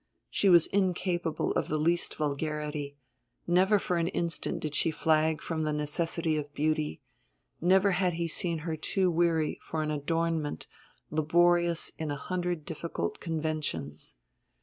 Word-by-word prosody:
She 200 Hz, -, +3 dB
was 170 Hz, -3 st, +7 dB
incapable 180 Hz, -4 st, 0 dB
of -, -, 0 dB
the 155 Hz, -, 0 dB
least 170 Hz, +3 st, +1 dB
vulgarity; 150 Hz, -1 st, -3 dB, 0.5 s
never 185 Hz, +4 st, +4 dB
for 180 Hz, -2 st, -1 dB
an 165 Hz, 0 st, +1 dB
instant 170 Hz, -2 st, -1 dB
did 155 Hz, -2 st, -3 dB
she 160 Hz, -, +3 dB
flag 155 Hz, 0 st, +1 dB
from 160 Hz, -2 st, -2 dB
the 155 Hz, -1 st, 0 dB
necessity 155 Hz, +2 st, -1 dB
of 145 Hz, -1 st, -4 dB
beauty, 155 Hz, -, -1 dB, 0.6 s
never 190 Hz, +3 st, +4 dB
had 180 Hz, -1 st, +1 dB
he 170 Hz, 0 st, -1 dB
seen 170 Hz, +1 st, -1 dB
her 165 Hz, -2 st, -1 dB
too 185 Hz, +4 st, +1 dB
weary 165 Hz, -2 st, +1 dB
for 155 Hz, -1 st, -3 dB
an 155 Hz, -, -2 dB
adornment 160 Hz, +1 st, -1 dB, 0.5 s
laborious 170 Hz, +2 st, +3 dB
in 160 Hz, -1 st, -2 dB
a 145 Hz, -, -2 dB
hundred 175 Hz, -1 st, -3 dB
difficult 160 Hz, -, -4 dB
conventions. 155 Hz, -, -3 dB
160 Hz, 145 wpm, -29 LUFS, 150-175 Hz, 0.6 s, was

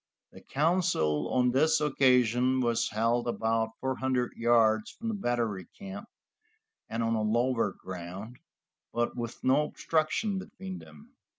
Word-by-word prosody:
The -, -, -13 dB
council 150 Hz, -, +1 dB
on 125 Hz, -1 st, +3 dB
this 155 Hz, +5 st, +3 dB
occasion 130 Hz, -3 st, +3 dB
was 120 Hz, -2 st, +1 dB
held 115 Hz, +3 st, +1 dB
about 115 Hz, -1 st, 0 dB
four 130 Hz, 0 st, -2 dB
hundred 130 Hz, -2 st, 0 dB
yards 115 Hz, -2 st, +3 dB
from 230 Hz, -, -6 dB
the -, -, -1 dB
battery 120 Hz, -, -1 dB
camp, 200 Hz, +2 st, -8 dB, 0.8 s
and 115 Hz, +1 st, -2 dB
on 115 Hz, 0 st, +1 dB, 0.2 s
lower 120 Hz, -2 st, +1 dB
ground, 95 Hz, +7 st, -8 dB, 0.5 s
but 120 Hz, 0 st, -1 dB
with 120 Hz, -1 st, -6 dB
no 140 Hz, +4 st, +4 dB
obstruction 165 Hz, +7 st, 0 dB
between 190 Hz, 0 st, -8 dB
them. 225 Hz, +3 st, -15 dB
125 Hz, 130 wpm, -29 LUFS, 115-155 Hz, 0.8 s, no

